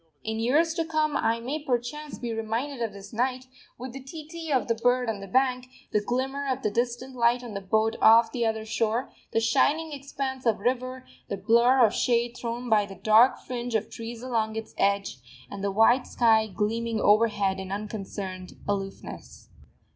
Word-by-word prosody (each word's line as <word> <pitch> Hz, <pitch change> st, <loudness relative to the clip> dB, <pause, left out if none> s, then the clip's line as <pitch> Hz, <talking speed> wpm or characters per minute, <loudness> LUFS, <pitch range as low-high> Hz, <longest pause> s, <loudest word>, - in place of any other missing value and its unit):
In 220 Hz, 0 st, -3 dB
years 300 Hz, +8 st, +2 dB
to 330 Hz, -1 st, 0 dB
come 310 Hz, -2 st, 0 dB
I 230 Hz, -3 st, +1 dB
may 280 Hz, +6 st, -4 dB
perchance 270 Hz, +4 st, -3 dB
be 235 Hz, -2 st, -4 dB
reminded 230 Hz, +5 st, -3 dB
of 225 Hz, -2 st, -1 dB
this 200 Hz, +3 st, -12 dB
night, 255 Hz, +2 st, -1 dB, 0.3 s
with 250 Hz, 0 st, -7 dB
the 270 Hz, -, -7 dB
tee 300 Hz, +3 st, -9 dB
tee 325 Hz, -1 st, -6 dB
of 260 Hz, -3 st, +2 dB
the 230 Hz, -, +2 dB
bird 245 Hz, +2 st, +1 dB
on 210 Hz, -, -6 dB
the 195 Hz, -, -8 dB
bank, 255 Hz, +3 st, +1 dB, 0.2 s
the 210 Hz, -, +2 dB
glimmer 265 Hz, +5 st, -2 dB
of 265 Hz, 0 st, -2 dB
the 210 Hz, -, +1 dB
distant 240 Hz, +3 st, -2 dB
light 240 Hz, +1 st, +2 dB
on 235 Hz, -3 st, -7 dB
the 200 Hz, -, -4 dB
boat 220 Hz, +3 st, +1 dB
off 225 Hz, 0 st, +7 dB
the 240 Hz, -, -1 dB
other 220 Hz, -1 st, -1 dB
shore, 225 Hz, +2 st, -1 dB, 0.2 s
the -, -, +2 dB
shining 295 Hz, +7 st, +2 dB
expanse 275 Hz, -2 st, -4 dB
of 220 Hz, -, +3 dB
river, 255 Hz, +3 st, -2 dB, 0.2 s
the 200 Hz, -, -2 dB
blur 235 Hz, +5 st, +5 dB
of 210 Hz, -, +1 dB
shade 240 Hz, 0 st, +1 dB
thrown 240 Hz, 0 st, -4 dB
by 210 Hz, -3 st, +3 dB
the 195 Hz, -, -10 dB
dark 220 Hz, +6 st, +5 dB
fringe 245 Hz, -2 st, -4 dB
of 220 Hz, -1 st, -1 dB
trees 230 Hz, +1 st, -7 dB
along 225 Hz, -3 st, -1 dB
its 225 Hz, 0 st, -6 dB
edge, 200 Hz, -5 st, 0 dB, 0.3 s
and 200 Hz, 0 st, -6 dB
the 200 Hz, -, +1 dB
white 225 Hz, +5 st, +4 dB
sky 220 Hz, -2 st, +3 dB
gleaming 220 Hz, +3 st, -1 dB
overhead 205 Hz, -3 st, +3 dB
in 190 Hz, 0 st, -6 dB
unconcerned 195 Hz, -3 st, -5 dB
aloofness. 195 Hz, -1 st, -5 dB
235 Hz, 190 wpm, -27 LUFS, 220-255 Hz, 0.3 s, off